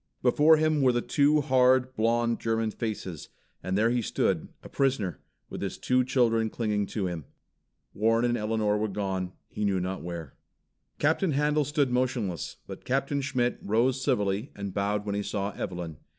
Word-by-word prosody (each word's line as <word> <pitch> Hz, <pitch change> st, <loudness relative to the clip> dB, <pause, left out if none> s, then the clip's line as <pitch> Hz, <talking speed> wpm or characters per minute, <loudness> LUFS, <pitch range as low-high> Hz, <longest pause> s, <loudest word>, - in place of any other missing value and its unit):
Before 150 Hz, +5 st, +5 dB
him 155 Hz, -1 st, +2 dB
were 130 Hz, -2 st, +5 dB
the 120 Hz, 0 st, -1 dB
two 150 Hz, +1 st, +3 dB
hard, 130 Hz, -1 st, +3 dB
blonde 115 Hz, +1 st, +1 dB
German 115 Hz, -1 st, 0 dB
faces, 100 Hz, -8 st, -5 dB, 0.3 s
and 95 Hz, +1 st, -1 dB
there 115 Hz, +2 st, +3 dB
he 125 Hz, 0 st, +1 dB
stood, 95 Hz, -6 st, 0 dB, 0.2 s
a -, -, -9 dB
prisoner, 125 Hz, -10 st, 0 dB, 0.3 s
with -, -, -7 dB
his -, -, -3 dB
two 125 Hz, 0 st, +2 dB
children 115 Hz, -3 st, +2 dB
clinging 105 Hz, -3 st, -1 dB
to 105 Hz, -4 st, -2 dB
him. 85 Hz, -5 st, -4 dB, 0.7 s
Warren 115 Hz, +3 st, +2 dB
and 120 Hz, 0 st, +1 dB
Elinor 105 Hz, -2 st, 0 dB
were 110 Hz, -, 0 dB
gone, 95 Hz, -2 st, -3 dB
he 105 Hz, -, -5 dB
knew 100 Hz, -2 st, +1 dB
not 95 Hz, +1 st, -3 dB
where. 85 Hz, -4 st, -6 dB, 0.6 s
Captain 160 Hz, +2 st, +2 dB
Handel 150 Hz, +1 st, +2 dB
stood 145 Hz, -2 st, +1 dB
motionless, 125 Hz, -, -1 dB
but -, -, -9 dB
Captain 135 Hz, +2 st, 0 dB
Schmitt 125 Hz, -3 st, 0 dB
rose 125 Hz, +5 st, +1 dB
civilly 105 Hz, -2 st, 0 dB
and 100 Hz, -2 st, -5 dB
bowed 105 Hz, +1 st, -1 dB
when 100 Hz, -, -2 dB
he 100 Hz, -, -1 dB
saw 100 Hz, 0 st, -2 dB
Evelyn. 90 Hz, -5 st, -5 dB
115 Hz, 170 wpm, -28 LUFS, 100-130 Hz, 0.7 s, Before